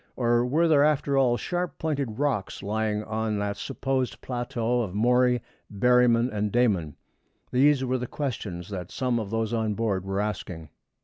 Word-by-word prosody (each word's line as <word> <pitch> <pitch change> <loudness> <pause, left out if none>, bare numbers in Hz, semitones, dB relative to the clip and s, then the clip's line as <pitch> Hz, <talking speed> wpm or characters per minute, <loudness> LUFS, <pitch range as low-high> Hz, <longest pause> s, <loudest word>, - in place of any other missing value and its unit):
or 120 -1 +2
were 155 +7 +2
there, 145 -3 +5
after 145 -2 +2
all, 125 -3 +3
sharp 175 -1 -3
pointed 140 -8 -2
rocks 135 -12 -1
lying 105 +1 -1
on 110 -1 -2
that 100 0 -2
supposed 135 -1 -2
plateau 120 -1 -1
of 100 -5 -4
Maury, 125 +2 +3 0.3
Berryman, 120 +2 +4
and 105 0 -1
Dayman? 95 - +1 0.6
These 135 +1 +4
were 130 0 0
the 125 - -4
questions 105 - -4
that 90 -3 -5
some 125 -2 -1
of 105 -3 -4
those 115 +1 -1
on 110 -2 0
board 100 -4 -1
were 95 +1 -2
asking. 90 -6 -4
120 Hz, 165 wpm, -26 LUFS, 105-130 Hz, 0.6 s, there